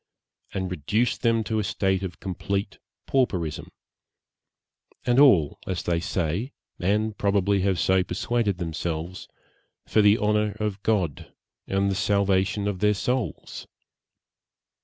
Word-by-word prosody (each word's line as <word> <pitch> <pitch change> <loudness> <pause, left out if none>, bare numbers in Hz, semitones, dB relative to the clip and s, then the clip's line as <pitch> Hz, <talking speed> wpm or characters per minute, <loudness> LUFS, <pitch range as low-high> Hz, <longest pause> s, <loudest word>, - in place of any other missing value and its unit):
_ - - -13
and 95 -1 -3
reduced 105 - 0
them 115 -2 +2
to 110 0 -1
a - - 0
state 95 -1 0
of 95 -3 -6
complete 100 +1 -3 0.3
pauperism 90 - -1 1.3
and 120 +1 +3
all, 95 - +5
as 95 -2 -2
they 85 -1 0
say, 90 - -2 0.3
and 105 +3 0
probably 100 -1 +2
have 95 -1 +1
so 95 0 +3
persuaded 100 +2 -1
themselves, 85 +1 -4 0.6
for 110 - +3
the 105 +1 +5
honour 105 -1 +1
of 105 -2 -2
God, 95 - -1 0.4
and 100 0 +1
the - - -1
salvation 100 0 +1
of 100 -3 -2
their 105 +1 +3
souls! 125 - -3
100 Hz, 130 wpm, -25 LUFS, 90-105 Hz, 1.3 s, all